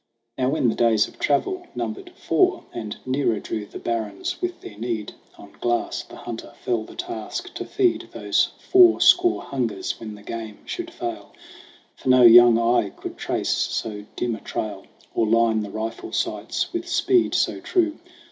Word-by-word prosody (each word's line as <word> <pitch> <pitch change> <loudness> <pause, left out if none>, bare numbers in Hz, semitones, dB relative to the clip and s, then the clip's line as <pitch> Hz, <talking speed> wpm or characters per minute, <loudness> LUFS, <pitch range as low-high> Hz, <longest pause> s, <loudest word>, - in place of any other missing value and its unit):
Now 130 0 +1
when 140 -3 +1
the 115 - +2
days 115 -3 +3
of - - -17
travel 355 - 0
numbered 375 -2 -4
four 370 -2 +1
And 110 -3 -5
nearer 130 -4 +1
drew 105 -1 -5
the - - -9
barrens 110 - -3
with 360 -1 -3
their 105 - -10
need, 110 -1 -4 0.2
On - - -13
Glass, 120 0 0
the - - -13
hunter, 120 0 -8
fell 120 -2 +1
the - - -13
task 355 0 -5
to - - -5
feed 375 -3 +1
Those - - +1 0.2
four 365 -2 +7
score 360 0 +5
hungers 115 -8 -3
when 110 -2 -7
the 105 - -14
game 110 -1 -7
should 350 -2 -5
fail. 345 0 -6 0.6
For - - -4
no 130 -1 +7
young 120 0 +9
eye 115 -3 +2
could - - -8
trace - - -2
so 105 -2 -2
dim 120 -1 -1
a - - -11
trail, 100 -3 -5 0.3
Or 110 - +1
line 115 0 +3
the 105 - -5
rifle 110 +2 -5
sights - - -2
with 345 0 -3
speed 350 +1 +2
so - - +1
true. 330 -4 0
120 Hz, 175 wpm, -23 LUFS, -, 0.6 s, young